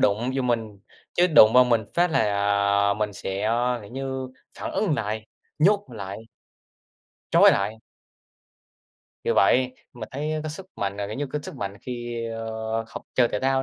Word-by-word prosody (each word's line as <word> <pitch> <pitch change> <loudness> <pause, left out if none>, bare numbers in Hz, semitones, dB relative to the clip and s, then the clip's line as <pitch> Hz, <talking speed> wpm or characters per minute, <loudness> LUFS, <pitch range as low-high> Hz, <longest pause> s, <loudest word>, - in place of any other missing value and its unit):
đụng 110 +5 +2
vô 135 - 0
mình. 115 -4 -1 0.4
Chứ 175 - +4
đụng 130 -10 +7
vào 125 0 +8
mình 115 -3 +2
phát 175 0 +3
là, 160 - +2 0.7
ờ, 100 - +2
mình 105 0 -2
sẽ, 95 0 -4
ơ, 120 +2 +1
kiểu 100 - -12
như, 130 -1 -4 0.3
phản - - -4
ứng 195 -8 +1
lại. 110 -2 -3 0.3
Nhốt 200 +6 +4
lại. 100 +1 -7 1.0
Trói - - +7
lại. 100 +3 0 1.5
Vì - - +1
vậy, 125 +5 +3 0.2
mình 115 -3 -8
thấy, 150 +3 -2
ơ, 155 - -2
cái 155 - -4
sức 185 +5 -8
mạnh 100 0 -2
là, 100 0 -3
kiểu 105 - -6
như, 145 - -2
cái 150 +3 -4
sức - - -8
mạnh 100 0 -5
khi, 120 -2 -5
ơ, 110 0 -3
học - - -8
chơi 120 -2 +4
thể 105 - -3
thao 135 0 +2
120 Hz, 185 wpm, -25 LUFS, 110-135 Hz, 1.5 s, vào